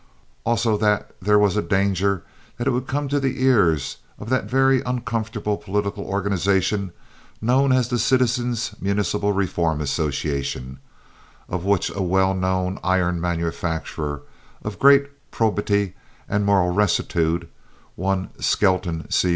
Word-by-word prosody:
Also 115 Hz, -2 st, +2 dB
that 105 Hz, -1 st, 0 dB
there 105 Hz, +3 st, +4 dB
was 105 Hz, -2 st, +3 dB
danger 100 Hz, -2 st, +1 dB, 0.3 s
that 120 Hz, -, -3 dB
it 135 Hz, -, +3 dB
would 125 Hz, +1 st, -2 dB
come 145 Hz, +3 st, -1 dB
to 145 Hz, +1 st, +1 dB
the 135 Hz, -1 st, -1 dB
ears 80 Hz, -, +3 dB, 0.2 s
of 105 Hz, -, -8 dB
that 130 Hz, -, +1 dB
very 135 Hz, 0 st, +3 dB
uncomfortable 115 Hz, -4 st, -2 dB
political 100 Hz, 0 st, -2 dB
organization 100 Hz, 0 st, 0 dB, 0.5 s
known 130 Hz, +4 st, +3 dB
as 130 Hz, -2 st, +3 dB
the 120 Hz, -1 st, -1 dB
Citizens' 120 Hz, -1 st, +1 dB
Municipal 100 Hz, +1 st, 0 dB
Reform 85 Hz, -5 st, 0 dB
Association, 70 Hz, -3 st, -2 dB, 0.7 s
of 90 Hz, 0 st, -4 dB
which 100 Hz, -3 st, +1 dB
a 100 Hz, -, -4 dB
well 95 Hz, +1 st, +2 dB
known 95 Hz, 0 st, -1 dB
iron 90 Hz, -2 st, +1 dB
manufacturer 80 Hz, -3 st, -3 dB, 0.4 s
of 105 Hz, -3 st, -6 dB
great 140 Hz, +1 st, +4 dB
probity 105 Hz, -3 st, 0 dB, 0.3 s
and 105 Hz, -1 st, 0 dB
moral 95 Hz, -3 st, +3 dB
rectitude, 85 Hz, -4 st, +1 dB, 0.5 s
one 95 Hz, +1 st, -1 dB
Skelton 90 Hz, -4 st, +1 dB
C. 90 Hz, -, +2 dB
100 Hz, 125 wpm, -22 LUFS, 90-115 Hz, 0.7 s, there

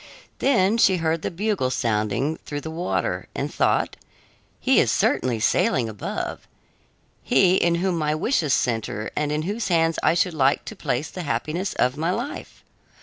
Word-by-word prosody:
Then 225 Hz, -4 st, +3 dB
she 190 Hz, -4 st, +5 dB
heard 165 Hz, -1 st, 0 dB
the -, -, -2 dB
bugle 195 Hz, -6 st, -1 dB
sounding 115 Hz, +5 st, 0 dB
through 145 Hz, -1 st, -6 dB
the 160 Hz, -, -6 dB
water 95 Hz, -, -2 dB
and -, -, -3 dB
thought: -, -, +1 dB, 0.6 s
"He -, -, +4 dB
is -, -, +3 dB
certainly 120 Hz, -3 st, +1 dB
sailing 120 Hz, +2 st, +2 dB
above, 105 Hz, -2 st, -5 dB, 0.7 s
he 185 Hz, -1 st, +4 dB
in 170 Hz, 0 st, +2 dB
whom 175 Hz, 0 st, 0 dB
my 150 Hz, 0 st, 0 dB
wishes 160 Hz, -, 0 dB
center 110 Hz, -3 st, -2 dB
and 150 Hz, -1 st, -1 dB
in 150 Hz, +1 st, -1 dB
whose 205 Hz, +6 st, -2 dB
hands 165 Hz, -2 st, +2 dB
I -, -, +3 dB
should 175 Hz, 0 st, +1 dB
like 140 Hz, -2 st, +2 dB
to -, -, -7 dB
place 130 Hz, +5 st, -2 dB
the 185 Hz, -, -6 dB
happiness 170 Hz, +4 st, -2 dB
of 125 Hz, +3 st, +1 dB
my 165 Hz, +3 st, -1 dB
life. 275 Hz, +10 st, -5 dB
160 Hz, 165 wpm, -23 LUFS, 130-180 Hz, 0.7 s, she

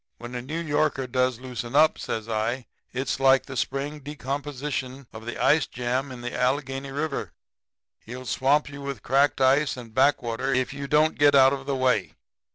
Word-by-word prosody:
When 120 Hz, +1 st, -9 dB
a 125 Hz, -, -3 dB
New 150 Hz, +6 st, -5 dB
Yorker 150 Hz, -4 st, 0 dB
does 125 Hz, -1 st, 0 dB
loosen 125 Hz, -1 st, -6 dB
up,' 155 Hz, +2 st, +5 dB
says 110 Hz, 0 st, -4 dB
I, 115 Hz, +3 st, -1 dB, 0.3 s
'it's 130 Hz, +1 st, -2 dB
like 135 Hz, 0 st, +5 dB
the 135 Hz, -, -8 dB
spring 140 Hz, +4 st, -2 dB
decomposition 140 Hz, -1 st, -4 dB
of 110 Hz, +1 st, -10 dB
the 120 Hz, -, -4 dB
ice 150 Hz, -2 st, +3 dB
jam 125 Hz, +3 st, -2 dB
in 125 Hz, -1 st, -8 dB
the 120 Hz, 0 st, -5 dB
Allegheny 135 Hz, +1 st, -1 dB
River. 145 Hz, +1 st, -3 dB, 0.7 s
He'll 125 Hz, +3 st, -9 dB
swamp 140 Hz, +4 st, +2 dB
you 140 Hz, 0 st, -9 dB
with 140 Hz, -1 st, -5 dB
cracked 140 Hz, +2 st, +2 dB
ice 135 Hz, +2 st, +3 dB
and 115 Hz, -3 st, -10 dB
back 135 Hz, +2 st, +3 dB
water 120 Hz, +3 st, -2 dB
if 130 Hz, +1 st, 0 dB
you 140 Hz, 0 st, -5 dB
don't 155 Hz, +2 st, +2 dB
get 145 Hz, -1 st, +6 dB
out 135 Hz, 0 st, +7 dB
of 135 Hz, -1 st, -6 dB
the 140 Hz, -, 0 dB
way. 125 Hz, -6 st, +1 dB
135 Hz, 185 wpm, -25 LUFS, 125-145 Hz, 0.7 s, out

